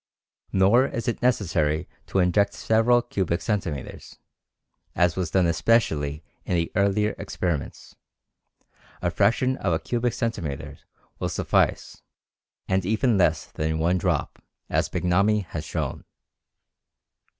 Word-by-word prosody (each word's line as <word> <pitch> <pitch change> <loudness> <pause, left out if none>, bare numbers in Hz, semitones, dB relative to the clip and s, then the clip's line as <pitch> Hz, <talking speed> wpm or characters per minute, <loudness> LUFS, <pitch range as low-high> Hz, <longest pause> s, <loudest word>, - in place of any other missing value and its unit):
Nor 100 +8 +4
is 115 -4 -5
it 120 - -1
necessary 85 -10 +1 0.2
to - - -2
inject 95 +2 +2
several 115 +2 +3
cubic 95 -7 -1
centimeters, 90 - -4 0.8
as 90 -1 +2
was 90 -3 -2
done 95 +2 +2
especially 80 -6 +1 0.2
in 90 - -1
the 85 -1 0
earlier 100 +1 +2
experiments; 80 -7 -4 1.1
a - - +1
fraction 130 +3 +2
of 90 - 0
a - - +2
cubic 120 -1 -1
centimeter 85 - -4 0.4
will - - -1
suffice, - - 0 0.7
and 95 0 +1
even 110 +5 +1
less 80 -3 +2
than 80 +1 -2
one 85 +3 +1
drop, - - -2 0.3
as - - +1
Bignami 100 +4 +2
has 80 -2 -6
shown." - - -4
95 Hz, 120 wpm, -25 LUFS, 80-110 Hz, 1.1 s, Nor